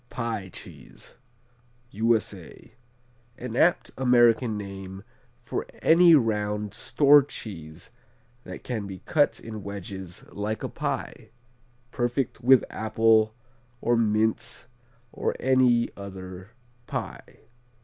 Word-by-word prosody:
Pie 115 -5 -4
Cheese - - -12 0.8
U.S.A 110 -1 -2 0.6
An 120 -2 -6
apt 170 +6 +2
American 120 -3 +4
name 95 -1 -8 0.4
for - - -4
any 170 0 +6
round 105 -4 0
store 145 0 +5
cheese 85 - -9 0.5
that - - -9
can 110 -5 -4
be 95 -2 -9
cut 145 -2 +2
in 110 -2 -8
wedges 95 -2 -7
like 105 +2 -4
a - - -2
pie. - - -4 0.6
Perfect 120 +1 -2
with 130 0 +5
apple 110 0 +2 0.4
or 120 0 +1
mince 110 -1 0 0.5
or - - -2
any 125 -2 +3
other 95 -1 -9 0.4
pie. - - -6
110 Hz, 100 wpm, -26 LUFS, 100-120 Hz, 0.8 s, any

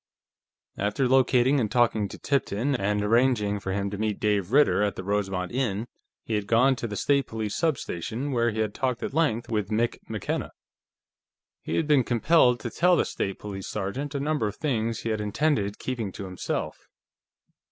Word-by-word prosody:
After 105 +6 +1
locating 130 +1 +4
and 110 -4 0
talking 115 -3 +2
to - - -9
Tipton 135 -1 0
and 105 -3 0
arranging 105 -2 +2
for 95 - -4
him 100 +1 -2
to 100 - -5
meet 110 -2 -1
Dave 105 -2 0
Ritter 145 -5 +4
at 105 -1 0
the - - -6
Rosemont 95 -2 -1
Inn, 115 -4 -1 0.4
he 115 - -4
had 105 -2 -1
gone 125 +5 +4
to 120 - -3
the 105 - -5
State 140 +5 +1
Police 110 -2 -4
substation, 135 - -2
where 120 -2 +2
he 110 0 -2
had 105 -2 -1
talked 130 -3 -2
at - - -3
length 145 -8 +1
with 105 -4 -1
Mick 115 +2 0
McKenna. - - -3 1.1
He - - -3
had 165 - +1
been 145 -3 +4
compelled 125 +1 +3
to - - -4
tell 180 +1 +4
the - - +2
State 95 -1 -3
Police 95 -2 -7
sergeant 130 +9 -4
a - - 0
number 145 -5 0
of 105 - -5
things 115 -7 -1
he 115 - -3
had 110 -1 -1
intended 105 -2 0
keeping 120 -6 -3
to 100 - -6
himself. 90 -1 -4
115 Hz, 185 wpm, -26 LUFS, 105-130 Hz, 1.1 s, locating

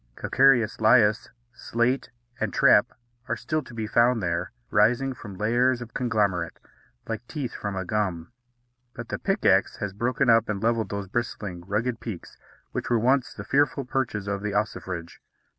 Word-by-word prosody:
Calcareous 125 -5 +3
lias, 110 -1 +4 0.2
slate, 120 +2 -1 0.3
and - - -1
trap - - +5 0.4
are - - -1
still 155 0 -2
to 130 - -13
be 110 -1 -3
found 120 +2 +3
there, 85 -2 -2 0.2
rising 120 +5 +3
from 105 -5 -10
layers 120 +4 +2
of 120 -1 -9
conglomerate, 105 -8 0 0.5
like 115 +1 -5
teeth 140 -7 -4
from 100 -1 -4
a 95 -1 -3
gum; 95 -4 -2 0.6
but - - -8
the - - -3
pickaxe - - +2
has 100 -2 -4
broken 125 +5 0
up 115 -1 +4
and 100 -1 -2
levelled 115 -1 +1
those 100 -1 -4
bristling, 105 -4 -4
rugged 115 +4 -1
peaks 105 -7 -8 0.4
which - - -4
were 120 - +3
once 130 +3 +2
the - - -7
fearful 140 -1 +1
perches 120 -7 -2
of 100 -1 -2
the 105 -1 -3
ossifrage. 90 -5 -3
115 Hz, 160 wpm, -26 LUFS, 100-125 Hz, 0.6 s, trap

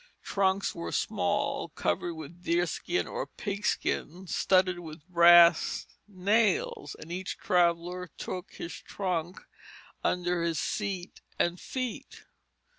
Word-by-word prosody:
Trunks 195 0 +1
were 85 0 -5
small, - - 0
covered 125 - -1
with 160 +3 -10
deerskin 175 - 0
or - - -4
pigskin, 200 -3 -2
studded 185 0 +2
with 155 -1 -10
brass 170 -1 +6 0.2
nails; 225 - +1
and 165 - -10
each 185 +1 -4
traveller 180 -2 +1
took 185 +1 -5
his 170 - -6
trunk 180 -2 -3 0.6
under 180 -1 +1
his 170 -1 0
seat 195 -4 -3 0.2
and 175 +1 +1
feet. 255 -3 -5
180 Hz, 110 wpm, -29 LUFS, 170-195 Hz, 0.6 s, brass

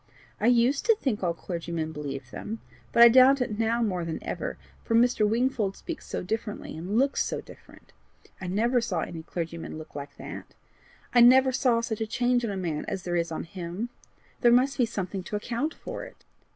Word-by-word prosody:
I 220 - +2
USED 245 +3 +3
to 455 - +6
think 265 - -2
all 170 -3 0
clergymen 170 -2 -4
believed 140 -4 -6
them, 220 +2 -6 0.3
but 235 - +7
I - - +12
doubt 260 +3 +7
it 225 -4 -2
now 230 +1 +2
more 185 -5 -1
than 165 -1 -3
ever, - - -4 0.3
for 230 - 0
Mr. 230 -3 +4
Wingfold 230 -4 0
speaks 335 -3 -7
so - - -3
differently 215 +2 -4
and 180 +7 -2
looks 275 +2 +2
so - - -3
different. - - -15 0.5
I 185 - -4
never 235 +7 +2
saw 195 -8 -1
any 165 0 -5
clergyman 165 0 -5
look 155 0 -10
like 140 0 -8
that; - - -7
and - - -8 0.7
I 240 - +6
never 260 +1 +6
saw 245 -2 +2
such 225 -2 -3
a 220 - -1
change 245 +1 +1
on 230 - -1
a 200 - -3
man 165 -5 -2
as 185 - -3
there 175 -1 -2
is 170 -1 0
on 160 - -3
him. 180 +5 -5 0.5
There 240 - +5
must 260 +3 +3
be 240 - +4
something 195 -3 -4
to 190 - -6
account 240 +9 -2
for - - -7
it. - - -13
215 Hz, 205 wpm, -27 LUFS, 175-245 Hz, 0.7 s, I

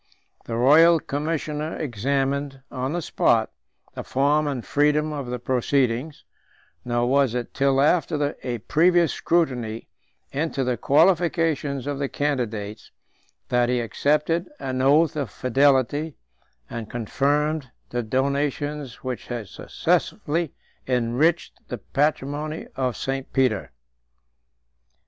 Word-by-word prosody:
The 115 - -4
royal 160 +7 +6
commissioner 150 +1 -3
examined, 135 +2 -1
on 130 +2 -3
the 175 -1 -2
spot, - - +2 0.4
the - - -6
form 145 +3 +2
and 135 -5 -3
freedom 150 +1 +2
of 140 -4 -4
the 125 0 -3
proceedings; 130 +2 0 0.6
nor 120 0 0
was 135 -2 +2
it 120 -1 -4
till 135 -1 +2
after 150 -1 +2
a 120 -2 -3
previous 170 - +3
scrutiny 125 -10 -1 0.4
into 140 -1 -1
the 125 -1 0
qualifications 160 - +2
of 145 -1 -3
the 140 -1 -1
candidates, 115 -7 -3 0.6
that 120 0 +2
he 125 0 +1
accepted 150 - 0
an 130 -1 -2
oath 150 +4 +4
of 140 -6 -2
fidelity, 140 +5 +2 0.5
and 115 -2 -6
confirmed 145 +5 0 0.2
the 120 - -1
donations 140 +3 -2
which 130 -2 -5
had 115 -5 -5
successively 160 +1 -1 0.4
enriched 125 +7 +1
the 125 - -4
patrimony 145 +5 -1
of 130 -2 -1
St. 135 0 -3
Peter. 130 -7 +1
140 Hz, 115 wpm, -24 LUFS, 125-150 Hz, 0.6 s, royal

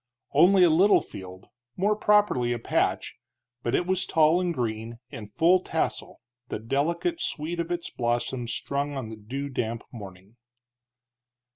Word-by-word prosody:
Only 180 +6 +6
a 170 - +6
little 190 +6 +5
field, 95 0 -10 0.3
more 205 +3 +2
properly 205 - +2
a - - -2
patch, 115 - -1 0.4
but 120 - 0
it 175 - +1
was 185 0 0
tall 160 +2 +4
and 180 -1 0
green, 115 -4 -3
in 105 -2 -8
full 170 - +3
tassel, 165 -3 -3 0.3
the - - -4
delicate 160 - -1
sweet 165 - -3
of 170 0 -2
its 175 -1 -3
blossoms 120 0 -2
strong 140 +4 -2
on 120 -5 -5
the 110 - -7
dew 125 +7 -5
damp 115 -3 -3
morning. 100 0 -11
140 Hz, 150 wpm, -26 LUFS, 115-175 Hz, 0.4 s, Only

